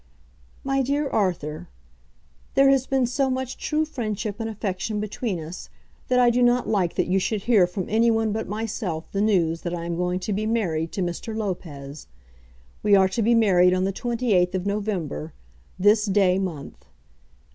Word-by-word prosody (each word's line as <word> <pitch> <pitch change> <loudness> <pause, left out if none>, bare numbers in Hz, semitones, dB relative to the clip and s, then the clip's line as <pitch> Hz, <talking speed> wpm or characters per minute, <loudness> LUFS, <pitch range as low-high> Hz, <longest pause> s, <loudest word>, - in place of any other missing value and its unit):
MY 270 0 +1
DEAR 285 +3 0
ARTHUR, 175 -5 -1 0.9
There 275 0 +6
has 270 -1 +2
been 265 -2 +2
so 265 +3 0
much 260 0 -3
true 310 +1 0
friendship 215 -7 -4
and 225 0 -3
affection 210 0 -3
between 210 -2 -3
us 160 +3 -8 0.4
that 250 - +2
I 245 -1 +5
do 245 +1 +1
not 245 0 +3
like 190 -6 0
that - - +1
you 190 +2 +1
should 205 +1 -2
hear 210 -7 +4
from 180 +1 -4
any 225 +2 +3
one 225 -1 +1
but 220 +1 -3
myself 205 -6 -4
the 200 - -1
news 170 -6 +2
that 175 0 -3
I 170 -1 -5
am 170 0 -2
going 180 +1 -1
to 210 - -2
be 215 +2 -1
married 170 -8 -1
to 190 - -1
Mr. 180 +6 -4
Lopez. 155 -9 -5 0.7
We 205 -1 +4
are 190 -1 +4
to 210 +5 -2
be 235 +2 +3
married 185 -5 +4
on 185 - 0
the 195 +1 0
28th 220 -6 +1
of 185 0 -2
November, 200 -7 -3 0.4
this 205 +3 +4
day 190 -2 +3
month. 170 -7 -6
205 Hz, 180 wpm, -24 LUFS, 180-230 Hz, 0.9 s, There